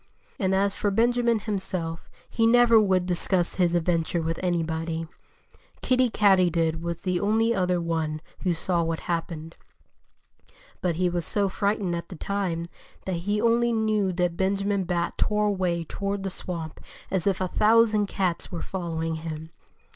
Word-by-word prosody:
And 190 -1 +1
as 200 +1 +2
for 205 - -1
Benjamin 235 +2 +2
himself, 185 -6 -4 0.2
he 225 -1 +1
never 235 -1 +6
would 190 -4 +2
discuss 180 0 0
his 175 -1 +3
adventure 170 0 +1
with 165 +1 -2
anybody. 165 -2 -1 0.8
Kiddie 255 -1 +3
Katydid 175 -6 +3
was 170 0 -4
the 180 -2 0
only 225 +3 +2
other 180 -3 +1
one 160 -2 -2 0.2
who 180 -3 0
saw 170 +1 0
what 165 -1 -2
happened. 165 -1 -4 1.2
But 175 -3 0
he 180 +2 +1
was 175 -1 -1
so 200 +3 0
frightened 200 -2 0
at 170 0 -6
the 185 - -8
time 175 -2 -2 0.4
that 185 -2 -1
he 210 +1 +1
only 235 +1 +3
knew 215 -3 +1
that 175 -1 0
Benjamin 195 +1 0
Bat 175 -1 -2
tore 210 0 +1
away 185 -4 0
toward 200 +4 -3
the 195 - -2
swamp 165 -4 -6 0.3
as 190 0 0
if 195 -2 +1
a 185 - 0
thousand 215 +1 +4
cats 185 -3 -2
were 170 - -4
following 165 -3 -3
him. 160 0 -7
185 Hz, 155 wpm, -26 LUFS, 170-205 Hz, 1.2 s, never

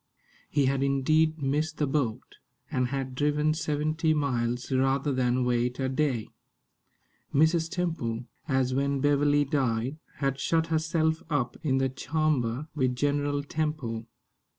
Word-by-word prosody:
He 145 -2 +2
had 135 0 +1
indeed 155 +3 +2
missed 150 +3 0
the 150 - +1
boat, 135 -5 -2 0.3
and 125 -1 +1
had 135 0 -3
driven 150 +3 +1
seventy 155 +1 0
miles 125 -3 -1
rather 135 +2 +2
than 125 0 +1
wait 125 +1 0
a 130 -1 0
day. 130 -5 0 1.0
Mrs. 160 +3 +3
Temple, 160 - -2 0.2
as 130 -3 +1
when 140 +1 +1
Beverley 145 +1 +3
died, 130 -1 0 0.2
had 135 -1 -1
shut 160 +4 +1
herself 160 0 +1
up 130 -6 0
in 135 -5 +1
the 135 0 +2
"charmber" 135 -1 -1
with 130 -4 0
General 145 +1 0
Temple. 145 -7 -3
140 Hz, 130 wpm, -28 LUFS, 130-155 Hz, 1.0 s, Mrs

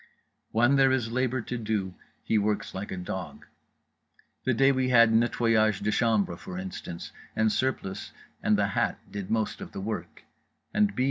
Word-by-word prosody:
When 120 +5 +4
there 135 -1 +5
is 120 -4 0
labour 130 +1 0
to 125 +1 -4
do 105 -4 -2 0.3
he 110 - +2
works 105 0 -1
like 95 +2 -5
a 95 - -4
dog… 90 0 -6 1.0
the 130 - +3
day 135 +3 +5
we 130 -1 +1
had 115 -2 +6
nettoyage 115 -2 +3
de 105 - +1
chambre, 105 -7 +1
for 90 - -8
instance, 90 -2 -6 0.2
and 110 0 +3
Surplice 115 -7 -2 0.3
and 105 - +3
The 100 -1 +1
Hat - - 0
did 100 -2 -5
most 110 -1 -1
of - - -8
the - - -5
work; 110 +3 -5 0.5
and 210 -1 +2
B. - - -5
110 Hz, 175 wpm, -28 LUFS, 100-125 Hz, 1.0 s, had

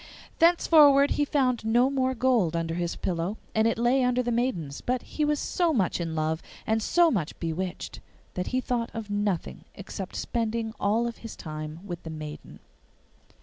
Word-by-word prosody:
Thenceforward 300 -4 +6
he 290 - +2
found 260 -5 +1
no 240 +4 +3
more 260 -1 0
gold 230 -9 +2
under 165 -1 -1
his 170 0 -2
pillow, 175 +4 -2 0.2
and 220 +1 +3
it 230 - 0
lay 245 +3 +3
under 250 0 +2
the 240 - -1
maiden's; 190 - -1
but 250 0 -1
he 305 - -3
was 295 -1 +1
so 345 -2 +1
much 185 -5 +1
in 165 -1 -3
love 155 +1 -1 0.2
and 220 0 +1
so 340 +8 +4
much 175 - -2
bewitched 175 +2 -4 0.3
that 180 - -3
he 255 - 0
thought 240 -2 -1
of 220 -2 -5
nothing 205 -4 -2
except 195 -1 -7
spending 225 -1 -2
all 215 +4 +2
his 230 -1 -10
time 155 +1 -7
with 175 -3 -6
the 160 - -8
maiden. 155 -1 -8
225 Hz, 175 wpm, -27 LUFS, 170-255 Hz, 0.3 s, Thenceforward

